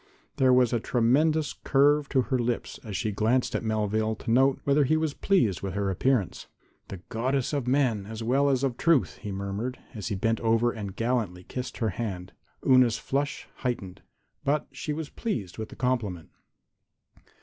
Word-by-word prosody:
There 130 -1 +4
was 125 -2 +4
a 120 - +2
tremulous 145 +8 +2
curve 145 +1 +2
to 130 - +3
her 125 +3 -1
lips 120 0 -2
as 105 -4 -4
she 110 -3 -1
glanced 115 +5 +1
at - - 0
Melvale 110 0 0
to 115 - -4
note 135 +3 +4
whether 145 +1 +3
he 155 +4 +2
was 155 -2 -1
pleased 120 - +1
with 95 -1 -4
her 100 -1 0
appearance. 115 0 0 0.4
"The 95 -3 -8
goddess 130 +4 -1
of 140 -4 -1
men, 125 -7 +1
as 110 +1 -6
well 135 +5 +2
as 135 -1 +1
of 130 -3 0
truth," 165 -3 +2
he 105 - -6
murmured 100 +6 -3 0.2
as 105 -7 -5
he 100 - -2
bent 115 +4 0
over 115 +1 +2
and 100 -4 -6
gallantly 115 -6 -1
kissed 125 +7 -6
her 115 -3 0
hand. 95 -3 -5 0.3
Una's 130 -3 +5
flush 140 +1 -2
heightened, 115 -8 -4 0.4
but 150 +2 +1
she 150 - -5
was 150 0 -4
pleased 110 - -4
with 110 -1 -5
the - - -11
compliment. 110 -10 -2
120 Hz, 180 wpm, -27 LUFS, 105-135 Hz, 0.4 s, Una's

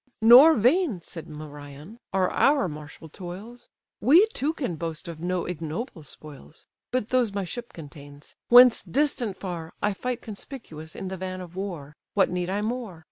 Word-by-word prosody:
"Nor 260 +8 +9
vain 250 - +2
(said 165 - -8
Merion) 150 +5 -10
are 190 -1 +1
our 280 -9 +3
martial 150 0 -9
toils; 195 +9 -10 0.3
We 320 - +6
too 285 +4 0
can 255 - -4
boast 165 0 -6
of 165 -2 -7
no 180 +1 -2
ignoble 165 - -5
spoils: 150 +1 -13 0.2
But 250 -4 -2
those 245 -5 +1
my 200 - -1
ship 240 +7 -7
contains; 145 -2 -13
whence 245 0 +8
distant 255 -7 -1
far, 170 -4 -6
I 210 - 0
fight 250 +4 -4
conspicuous 200 - -9
in 190 - -5
the 190 - -5
van 185 0 -5
of 180 -1 -10
war, 170 -7 -6 0.2
What 200 - +3
need 180 0 -2
I 200 +2 -1
more? 225 -6 -4
185 Hz, 165 wpm, -26 LUFS, 160-240 Hz, 0.3 s, Nor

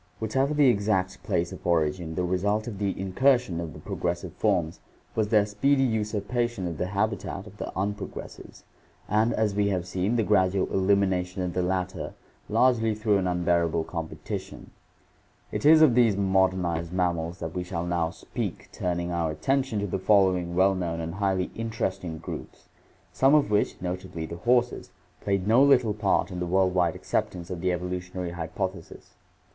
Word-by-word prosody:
Whatever 135 +7 0
the 145 -1 +5
exact 100 -4 +1
place 85 0 -1
of - - -8
origin, 80 0 0
the 90 - 0
result 100 +4 0
of 105 -5 -6
the 100 -3 -1
incursion 95 -1 +2
of 80 -2 -6
the - - -10
progressive 85 0 -3
forms 90 -6 0 0.3
was 110 -2 0
their 105 -1 +4
speedy 135 +7 +2
usurpation 110 -2 -1
of 85 -3 -5
the 90 - -1
habitat 100 0 -2
of 105 -1 -13
the - - -5
unprogressives 100 +2 -5 0.4
and, 110 +3 +2
as 110 -2 +1
we 100 0 +1
have 90 -3 -1
seen, 95 +5 -1
the 115 - +2
gradual 95 -2 +2
elimination 95 -2 +1
of 90 -1 -3
the 90 - 0
latter, 90 0 -2 0.3
largely 115 -4 +3
through 105 -2 +2
an 95 - -1
unbearable 85 -2 +1
competition. 80 -1 -6 0.8
It - - 0
is 160 0 +8
of 145 -6 +6
these 115 -4 +4
modernized 95 -4 +1
mammals 85 -2 -1
that 80 -2 -5
we 90 -1 -2
shall 90 -1 -4
now 85 -2 0
speak, - - -6
turning 85 -1 -2
our 85 -2 0
attention 130 - 0
to - - -1
the 95 0 -2
following 95 -3 +3
well 95 +2 +4
known 85 -3 -3
and 85 0 -4
highly 95 -2 0
interesting 100 -7 -3
groups, - - -9 0.4
some 135 +3 +4
of 140 -8 +3
which, 105 - +1
notably 90 -2 -4
the 85 +1 -7
horses, 120 +5 +1 0.3
played 100 -1 -1
no 115 +4 +5
little 125 -6 +5
part 105 -1 +1
in 90 - -5
the 90 - -2
world 95 +1 +2
wide 90 -3 +2
acceptance 90 0 -3
of 90 -2 -5
the 90 0 +1
evolutionary 90 0 -4
hypothesis. 85 +1 -5
95 Hz, 170 wpm, -26 LUFS, 90-105 Hz, 0.8 s, is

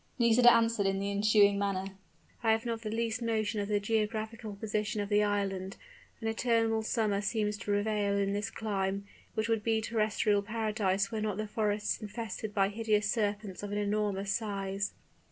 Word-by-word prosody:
Nisida 240 +1 +6
answered 230 -4 +3
in 195 0 +1
the 200 +1 -2
ensuing 205 0 +4
manner: 195 -2 -1 0.6
"I 225 -1 +4
have 225 +2 -1
not 230 -1 -2
the 215 - -4
least 225 +2 -1
notion 220 -2 0
of 200 - -3
the 205 0 +1
geographical 215 +1 -2
position 210 +1 -2
of 205 -1 -2
the 210 0 +4
island. 195 -2 -1 0.4
An 225 - -2
eternal 225 -1 +1
summer 215 -2 0
appears 210 +1 0
to - - -10
prevail 205 0 +1
in 200 0 +1
this 205 +2 -2
clime, 200 -2 -2 0.3
which 220 +1 0
would 225 -2 0
be 225 -1 +2
a - - -1
terrestrial 215 -2 +1
paradise 210 -2 0
were 220 -1 -2
not 210 -2 -1
the 215 - -2
forests 210 0 -1
infested 215 0 -5
by 195 -1 +2
hideous 210 -1 +1
serpents 205 -3 -2
of 205 0 -5
an 205 - -1
enormous 205 -1 0
size." 200 -2 -2
210 Hz, 180 wpm, -31 LUFS, 200-225 Hz, 0.6 s, Nisida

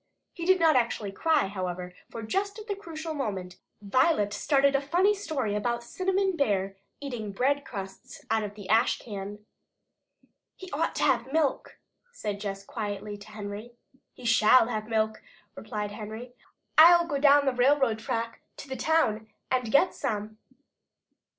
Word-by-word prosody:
He 335 - -6
did 375 0 +5
not 320 -3 +5
actually 230 -4 0
cry, 310 +7 +2
however, 180 -2 -5 0.2
for 230 - -7
just 400 - -2
at 430 - -8
the 410 -2 -3
crucial 325 -4 -6
moment 195 -10 -4 0.3
Violet 210 -1 +2
started 280 +1 +2
a 275 - +2
funny 355 +8 +3
story 300 - -2
about 235 +3 -1
Cinnamon 380 +7 0
Bear 195 - 0 0.2
eating 245 -7 -5
bread 275 +7 +1
crusts 195 -6 -9
out 225 0 +2
of 205 0 -6
the 205 -3 -10
ash 225 +4 +3
can. 205 -1 -8 1.1
"He 375 -1 -11
ought 315 +3 -1
to - - 0
have 260 -2 +2
milk," 305 -3 0 0.4
said 205 - -4
Jess 195 -1 -5
quietly 210 -5 -5
to 205 - -13
Henry. 210 +2 -7 0.4
"He 250 - -12
shall 225 +1 +5
have 215 -2 -3
milk," 220 -1 0 0.3
replied 210 -1 -5
Henry. 220 +4 -8 0.5
"I'll 340 +1 +8
go 290 -4 -2
down 285 0 +6
the 270 - +2
railroad 250 -2 +3
track 230 +1 -3 0.2
to - - -9
the 265 - -4
town 230 -7 +1 0.2
and 250 -3 0
get 345 +7 +4
some." 215 -4 -4
235 Hz, 155 wpm, -28 LUFS, 210-290 Hz, 1.1 s, I'll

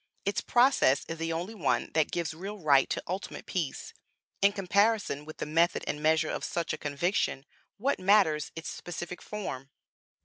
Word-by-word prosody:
Its 200 - 0
process 240 - +4
is 165 0 -5
the 165 0 -2
only 175 +6 -3
one 215 - 0
that 160 -1 +2
gives 170 -2 -2
real 195 +6 -6
right 145 -7 +4
to - - -2
ultimate 185 +3 -5
peace. 165 -7 -3 0.5
In 200 0 +6
comparison 200 -5 +1
with 155 - -10
the - - -3
method 165 +3 +2
and 150 - -3
measure 160 0 +3
of - - -4
such 170 -1 -2
a - - -3
conviction, 145 -1 -1 0.3
what 270 +7 0
matters 185 -6 +3
its 165 0 -5
specific 175 0 -6
form? 140 -11 -6
170 Hz, 170 wpm, -29 LUFS, 155-200 Hz, 0.5 s, In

